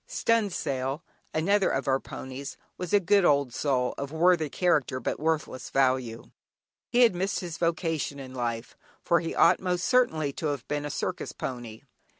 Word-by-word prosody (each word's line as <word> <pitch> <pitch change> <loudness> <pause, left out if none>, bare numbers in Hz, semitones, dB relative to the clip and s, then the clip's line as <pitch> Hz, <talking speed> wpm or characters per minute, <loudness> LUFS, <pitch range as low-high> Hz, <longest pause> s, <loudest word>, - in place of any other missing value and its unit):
"Stunsail", 160 - -1 0.3
another 195 +5 +2
of 135 +1 -2
our 135 0 +3
ponies, 135 +2 -8 0.2
was 180 -2 -6
a 205 - +5
good 200 +1 +3
old 140 -6 +3
soul, 125 -3 0
of 140 0 -4
worthy 160 -1 +3
character 150 -7 +1
but 115 - -3
worthless 155 -4 -2
value. 130 -4 0 0.6
He 245 +1 +3
had 235 -5 +6
missed 190 +3 -1
his 170 -3 -6
vocation 165 -4 -1
in 130 -1 -9
life, 120 -2 -3 0.3
for 170 - +3
he 165 0 -4
ought 175 - +5
most 180 -1 -1
certainly 160 - +2
to 155 - -3
have 140 -5 -3
been 145 0 -2
a - - -3
circus - - -3
pony. 120 -4 -6
150 Hz, 165 wpm, -27 LUFS, 130-180 Hz, 0.6 s, had